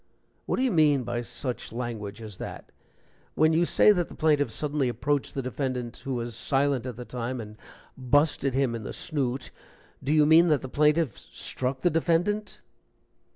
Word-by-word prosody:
"What - - +1
do 255 - 0
you 260 - +2
mean 150 -6 +4
by 120 0 -2
such 125 +1 -5
language 115 -3 -5
as 105 -4 -8
that? - - -8 0.6
When 155 +1 +4
you 170 +2 +3
say - - +6
that 180 -4 0
the - - -11
plaintiff 150 -2 +2
suddenly 145 -3 -1
approached 145 +3 -1
the 135 - -2
defendant, 130 -2 -3
who 135 -1 -4
was 120 0 -4
silent 135 0 0
at 125 - -5
the 125 +1 -8
time, 125 +1 -4
and 105 -1 -8 0.4
'busted 135 0 +1
him 135 -3 +1
in 115 - -4
the - - -6
snoot,' 135 -4 -3 0.5
do 135 - -1
you 155 -1 +5
mean 160 +3 +6
that 150 -4 +3
the 130 - -5
plaintiff 150 -3 +2
struck 130 +1 -4
the 175 - +3
defendant?" 175 +6 0
135 Hz, 180 wpm, -27 LUFS, 120-155 Hz, 0.6 s, say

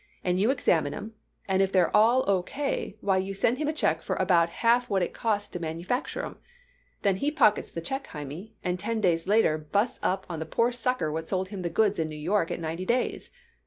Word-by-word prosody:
And 180 0 +1
you 210 +5 +3
examine 165 - +1
'em, 220 +2 -7 0.3
and 190 0 +2
if 195 0 +2
they're 185 -1 +3
all 235 +5 +4
O. 195 -2 +3
K., 275 -2 -3
why, 195 -2 +2
you 190 +1 -2
send 235 +6 +1
him 305 - -1
a - - +2
check 165 - 0
for - - -2
about 175 -3 +3
half 235 +6 +2
what 195 -3 +2
it - - -3
costs 210 -3 -1
to 175 - -6
manufacture 170 - -3
'em. - - -9 0.6
Then 195 -2 +2
he 280 - 0
pockets 255 -9 +3
the 165 - -5
check, 270 - -4
Hymie, 150 +9 -8
and 180 0 -1
ten 225 +3 -2
days 175 -4 +1
later 205 -7 +3
busts 200 +10 -1
up 190 +1 0
on 165 -3 -5
the 160 - -5
poor 230 +8 +2
sucker 245 -8 -1
what 160 +1 -4
sold 185 -1 -1
him 200 -2 -6
the 175 - -2
goods 205 +2 +2
in 160 -1 0
New 155 - -7
York 165 +3 0
at - - -3
ninety 165 +2 -4
days. 240 +6 -1
190 Hz, 230 wpm, -27 LUFS, 170-225 Hz, 0.6 s, all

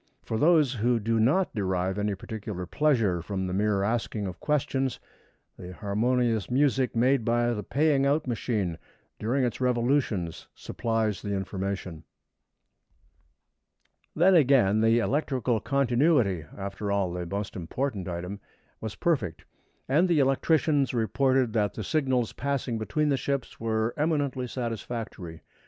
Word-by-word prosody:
For 110 - -3
those 155 -4 +4
who 120 0 +1
do 115 +1 0
not 150 +12 +2
derive 95 -1 -1
any 105 -1 0
particular 100 -2 -6
pleasure 115 - +1
from 95 +2 -3
the 90 - -3
mere 100 0 +1
asking 110 -1 -1
of 90 -2 -6
questions, 135 -3 -1 0.6
the 90 0 -8
harmonious 110 +2 0
music 130 -1 +2
made 125 +2 +3
by 120 +1 +1
the 105 - -3
paying 140 +5 +2
out 150 +2 +1
machine 105 -8 -2 0.4
during 130 +5 0
its 120 0 -2
revolutions 120 - 0
supplies 110 -3 -2
the 100 -1 -2
information. 95 -3 -4 2.1
Then 180 +4 +5
again, 130 - +4
the 115 +1 +4
electrical 125 -2 0
continuity 125 - +2
after 100 +1 -4
all, 100 -3 0
the 90 -1 -4
most 100 +2 -4
important 100 +3 -3
item 90 +3 -5 0.4
was 110 -2 -5
perfect, 145 - -1 0.4
and 155 +8 +3
the 170 - +3
electricians 140 0 +2
reported 130 +2 +1
that 105 -3 0
the 110 - -4
signals 130 -2 0
passing 135 -4 -2
between 150 +7 0
the 140 - +2
ships 140 -2 -3
were 110 0 0
eminently 145 -5 0
satisfactory. 115 -8 -5
115 Hz, 135 wpm, -27 LUFS, 100-135 Hz, 2.1 s, Then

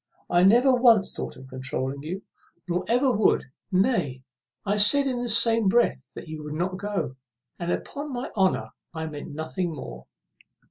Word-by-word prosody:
I 175 - +4
never 240 +8 +5
once 235 -5 +4
thought - - -6
of 130 +1 -12
controuling 130 +1 -3
you, 180 +6 -6 0.4
nor 175 +1 -1
ever 250 +3 +3
would. 215 -2 +2 0.3
Nay, 185 - +1 0.4
I 205 +1 0
said 275 +8 +5
in 250 -3 -1
the 245 - -2
same 230 -1 +5
breath 235 +5 +1
you 155 -1 -7
would 150 0 -6
not 185 +3 -2
go; 200 -10 -3 0.4
and, 175 0 -2
upon 290 +8 -4
my 250 0 -5
honour, 190 -3 +1 0.2
I 160 0 -3
meant 150 -2 -7
nothing 165 +3 -3
more." 65 - -9
190 Hz, 165 wpm, -25 LUFS, 155-235 Hz, 0.4 s, never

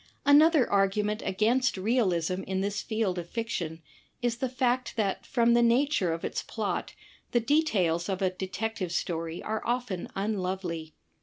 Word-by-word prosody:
Another 295 -1 +6
argument 205 +2 +1
against 230 +5 +1
realism 185 -5 +1
in 190 0 -1
this 200 +1 -1
field 215 -5 -1
of 170 0 -7
fiction, 170 -9 -4 0.4
is 240 -1 -1
the 260 +1 -1
fact 255 0 0
that 200 -4 -1
from 235 -2 +3
the 240 - +5
nature 240 - +3
of 165 0 -3
its - - -2
plot - - -3 0.4
the 240 - +5
details 220 - +1
of 190 -1 -1
a 190 -2 +1
Detective 190 0 -4
Story 165 -1 -3
are 220 0 -2
often 240 -7 -2
unlovely. 185 -5 -3
210 Hz, 150 wpm, -28 LUFS, 185-240 Hz, 0.4 s, Another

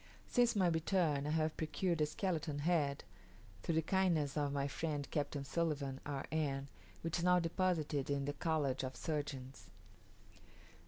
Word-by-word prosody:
Since 240 -2 +3
my 195 -3 +4
return, 160 -3 +2
I - - 0
have 155 0 +1
procured 165 +1 0
a 150 - +4
skeleton 160 -3 -1
head, 145 -2 +1 0.6
through 165 - 0
the 160 - +3
kindness 170 -6 +2
of 145 -2 +1
my 140 0 0
friend 145 -1 -2
Captain 145 -2 -1
Sulivan, 140 -3 -1
R. 140 -2 -3
N., 140 -3 -1 0.3
which 165 +1 -1
is - - -2
now 180 0 +6
deposited 165 -5 0
in 140 -1 0
the 145 - -1
College 145 -5 0
of 130 0 -4
Surgeons. 135 - -4
150 Hz, 155 wpm, -37 LUFS, 140-170 Hz, 0.6 s, now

